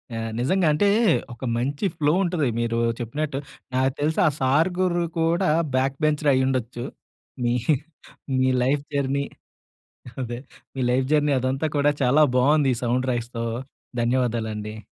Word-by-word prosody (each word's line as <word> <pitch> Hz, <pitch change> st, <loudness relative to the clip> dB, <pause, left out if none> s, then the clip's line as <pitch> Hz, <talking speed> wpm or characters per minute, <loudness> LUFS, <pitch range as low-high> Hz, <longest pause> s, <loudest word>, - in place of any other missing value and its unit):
ఆ! -, -, -3 dB, 0.2 s
నిజంగా. 175 Hz, +8 st, +2 dB
అంటే 200 Hz, +7 st, +2 dB, 0.5 s
ఒక 120 Hz, -, -12 dB
మంచి 140 Hz, -, -1 dB
ఫ్లో 150 Hz, -2 st, +2 dB
ఉంటది 170 Hz, -6 st, 0 dB
మీరూ 115 Hz, 0 st, 0 dB, 0.2 s
చెప్పినట్టు. 135 Hz, +4 st, -3 dB, 0.4 s
నాకు 130 Hz, +1 st, +2 dB
తెలిసి 155 Hz, +2 st, 0 dB
ఆ -, -, +5 dB
సార్ 140 Hz, +7 st, +3 dB
గురూ 175 Hz, -2 st, +1 dB, 0.2 s
కూడా 170 Hz, +3 st, +2 dB, 0.3 s
బ్యాక్ 135 Hz, +1 st, +1 dB
బెంచరే 150 Hz, -1 st, +2 dB
అయ్యుండొచ్చు. 130 Hz, -2 st, -1 dB, 0.6 s
మీ 120 Hz, 0 st, +2 dB, 0.9 s
మీ 130 Hz, 0 st, +3 dB
లైఫ్ 140 Hz, +3 st, +1 dB
జర్నీ 140 Hz, 0 st, 0 dB, 1.0 s
అదే 120 Hz, -1 st, -4 dB, 0.4 s
మీ -, -, -2 dB
లైఫ్ 130 Hz, +1 st, +2 dB
జర్నీ 150 Hz, -1 st, +3 dB
అదంతా 130 Hz, +4 st, -1 dB
కూడా 145 Hz, +1 st, +4 dB
చాలా 135 Hz, +4 st, +4 dB
బావుంది 140 Hz, +2 st, +4 dB
ఈ -, -, -6 dB
సౌండ్ 125 Hz, +2 st, 0 dB
రైజ్‌తో. 120 Hz, 0 st, -3 dB, 0.6 s
ధన్యవాదాలండి. 110 Hz, -3 st, -1 dB
135 Hz, 135 wpm, -24 LUFS, 120-150 Hz, 1.0 s, ఆ